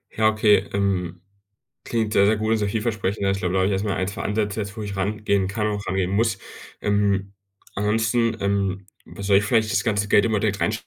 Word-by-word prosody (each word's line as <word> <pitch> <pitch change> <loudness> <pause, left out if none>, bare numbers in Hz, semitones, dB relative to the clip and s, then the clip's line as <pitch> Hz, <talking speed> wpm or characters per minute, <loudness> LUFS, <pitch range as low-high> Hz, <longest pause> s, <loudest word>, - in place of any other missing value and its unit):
Ja, 110 0 +4
okay, 110 -1 +3
ähm, 90 -3 -1 0.6
klingt 110 -2 -1
sehr, 100 - +4
sehr 110 +1 +3
gut 110 +1 -2
und 115 - +2
sehr 105 - -1
vielversprechend. 105 -2 -2
Ja, 95 - +2
ich 95 - -1
glaube, 90 -1 -2
da 95 - +2
habe 95 - +2
ich 100 - 0
erstmal 100 +1 -1
1 95 +2 -2
2 - - -6
Ansätze 105 0 -1
jetzt, 100 +1 -6
wo 110 - -5
ich 100 -1 -5
rangehen 100 -1 0
kann 105 +1 -2
und 105 - -1
auch 100 - -8
rangehen 95 -1 -1
muss. 110 0 +1 0.4
Ähm, 100 -1 +1 0.4
ansonsten, 110 +3 +1
ähm, 100 -1 -1 0.2
wa 100 - -10
soll 100 0 +4
ich 100 - -1
vielleicht 110 0 +1
das - - +2
ganze 105 -3 0
Geld 105 - +5
immer 110 -2 +1
direkt 100 -1 -1
rein 110 - +1
105 Hz, 230 wpm, -23 LUFS, 100-110 Hz, 0.6 s, Geld